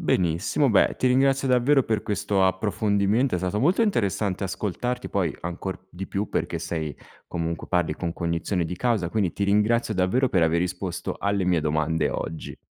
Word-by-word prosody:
Benissimo. 90 - +1
Beh, 100 - +4
ti 130 - 0
ringrazio 135 +1 +3
davvero 130 +2 +4
per 110 -3 -1
questo 100 -1 0
approfondimento. 100 +4 +1
È - - +1
stato 95 +4 -1
molto 175 - +3
interessante 100 - 0
ascoltarti 120 +6 -3
poi, 90 -7 -1
ancor 95 +2 -5
di 95 +2 -6
più, 100 +1 -3
perché 85 0 -2
sei 80 -3 -4 0.3
comunque 85 0 -3
parli 85 -4 0
con 85 -1 -3
cognizione 85 +1 -1
di 90 +2 -4
causa, 110 -5 0
quindi 100 -6 0
ti 100 - -4
ringrazio 110 +2 +2
davvero 105 +9 +2
per 90 -6 +2
aver 80 +1 +2
risposto 90 0 -3
alle 100 -2 0
mie 90 -3 +2
domande 80 +1 0
oggi. 80 -1 -5
95 Hz, 170 wpm, -25 LUFS, 85-110 Hz, 0.3 s, Beh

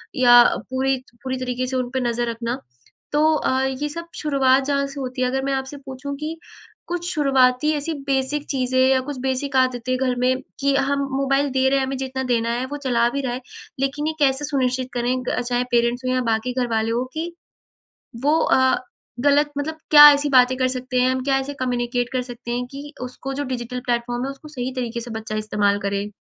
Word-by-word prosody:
या 245 -2 +8 0.3
पूरी 265 +1 +1
त 255 -1 -18
पूरी 260 0 -2
तरीके 255 0 -2
से 260 - -3
उन 250 -1 -2
पे 260 - -1
नज़र 240 -1 -1
रखना। 235 +2 -3 0.6
तो 295 +1 +3
अ, 265 -3 +1
ये 265 +3 -2
सब 335 +3 -7
शुरुआत 275 -3 +2
जहाँ 280 0 0
से 275 +1 -8
होती 255 0 -4
है - - +2
अगर 265 +1 -1
मैं 275 - 0
आपसे 265 +1 -3
पूछूँ 275 +1 -7
कि 310 +3 -5 0.5
कुछ 350 0 -3
शुरुआती 270 -1 +3
ऐसी 305 +3 -3 0.2
बेसिक 275 +2 0
चीज़ें 260 -1 0
या 260 0 +4
कुछ 285 - -4
बेसिक 265 +1 -2
आदतें 255 -1 +1
घर 255 -1 0
में 255 +1 +1 0.2
कि 280 0 +2
हम 280 +1 +1 0.2
मोबाइल 275 +1 +1
दे 265 0 +2
रहे 275 0 +2
हैं, 265 - 0
हमें 265 0 -3
जितना 265 0 -3
देना 235 -2 0
है 245 +2 -1
वो - - -3
चला 235 -1 +3
भी 280 +3 -2
रहा 255 -3 -2
है, 250 - -5 0.4
लेकिन 275 +3 -1
ये 315 - -1
कैसे 275 0 +2
सुनिश्चित 260 -3 -1
करें 245 +1 0
ग - - 0
चाहे 245 0 0
पेरेंट्स 240 +1 +1
हो 255 - +1
या 255 - +1
बाकी 225 +3 -1
घरवाले 230 -3 0
हो 240 +2 0
कि 330 +2 -3 0.9
वो 300 +3 +4
अ, 260 0 +3 0.4
गलत 290 +2 +3
मतलब 315 +2 -3
क्या 295 -1 +11
ऐसी 285 +1 0
बातें 255 -1 +5
कर 255 -1 +2
सकते 255 0 -4
हैं? 255 +1 +3
हम 260 0 -1
क्या 270 -1 +2
ऐसे 275 +2 -4
कम्युनिकेट 245 -1 -1
कर 255 - 0
सकते 245 -1 -9
हैं 245 +1 -2
कि 285 +2 -8
उसको 255 +2 -6
जो 285 +1 -2
डिजिटल 250 -1 -4
प्लेटफॉर्म 240 0 -1
है 270 - -3
उसको 275 +3 -11
सही 260 -3 -4
तरीके 235 -2 -3
से 235 +1 -8
बच्चा 220 -1 -5
इस्तेमाल 205 -1 +1
करे? 200 +1 -2
260 Hz, 215 wpm, -22 LUFS, 245-275 Hz, 0.9 s, क्या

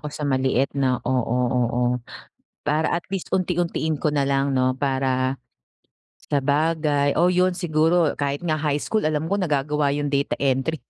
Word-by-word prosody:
ako 150 - -5
sa 150 0 -6
maliit, 130 -1 +1
'no? 130 -2 +1
Oo, 125 -1 0
oo 120 -1 0 0.9
para 155 +2 +1
at 170 - 0
least 195 -2 -5
unti-untiin 175 -4 0
ko 150 +1 -1
na 140 -2 +1
lang 140 0 +1
'no, 130 -1 +2
para 130 -1 0 0.9
sabagay, 145 0 +1
oo 175 - +5
'yon 180 +1 +3
siguro 165 -1 +1
kahit 140 0 -1
nga 165 -3 0
high 150 -1 0
school 215 +8 -1
alam 155 0 0
ko 200 - +1
nagagawa 150 -4 0
yung 145 0 -2
data 140 0 0
entry. 140 +3 0
145 Hz, 160 wpm, -23 LUFS, 135-160 Hz, 0.9 s, oo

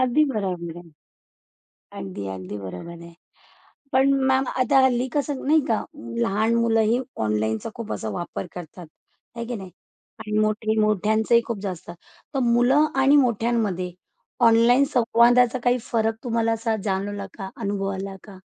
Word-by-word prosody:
अगदी 255 +4 +3
बरोबर 185 - -3
आहे. 170 -2 -14 1.1
अगदी, 100 +1 -6
अगदी 95 +1 -6
बरोबर 100 - -8
आहे. 170 0 -12 0.8
पण 270 +1 +4 0.2
मॅम 265 0 +3 0.2
आता 260 +2 +4
हल्ली 250 0 +1
कसं 285 -2 -1
नाही 310 +2 +5
का 220 -2 0 0.4
लहान 215 - +1
मुलंही 225 0 +2 0.3
ऑनलाईनचा 110 - -1
खूप 230 -2 -5
असा 110 - -4
वापर 175 - -5
करतात, 175 0 -9 0.5
आहे 235 0 -4
की 245 - -4
नाही 190 -2 -9 0.5
आणि 215 -1 -2
मोठे 215 +1 +1
मोठ्यांचंही 215 +2 +3
खूप 230 -3 -3
जास्त, 180 -4 -5 0.4
तर - - 0
मुलं 245 +5 +4
आणि 275 +2 +5
मोठ्यांमध्ये 225 -8 +1 0.6
ऑनलाईन 235 +4 +5
संवादाचा 240 +1 +4
काही 245 0 +3
फरक 225 -1 +1
तुम्हाला 230 -1 +1
असा 225 0 -1
जाणवला 200 0 -2
का, 190 -2 -6
अनुभवला 195 -1 -3
का? 195 -3 -12
220 Hz, 140 wpm, -23 LUFS, 190-240 Hz, 1.1 s, नाही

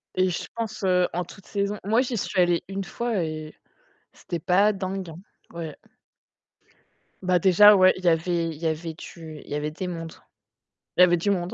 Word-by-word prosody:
Et 185 0 +2
je 175 - -3
pense 220 -2 -5
heu, 180 -1 +3
en 180 +2 -1
toutes 185 +2 -14
saisons 200 0 -2
moi 225 +4 +3
j'y 250 -2 -2
suis 195 -1 -2
allée 175 -1 +2
1 195 +1 -4
fois 230 -2 -2
et 155 -1 -6 0.6
c'était 170 -2 -6
pas 195 +6 +3
dingue 190 -2 -4
hein 160 - -10 0.4
ouais. 165 -3 -6 1.5
Bah 180 -1 +2
déjà 195 +4 +7
ouais, 185 -1 +6
il 185 - -10
y - - +1
avait 170 0 +1
il 160 - -7
y 165 - -6
avait 160 0 -2
du 160 -2 -10
il - - -16
y - - -4
avait 150 +1 -2
des 155 +5 -6
mondes 165 -2 -6 0.8
il - - +6
y - - +11
avait 175 -1 +5
du 175 +5 -1
monde. 180 -3 -1
180 Hz, 205 wpm, -25 LUFS, 165-195 Hz, 1.5 s, y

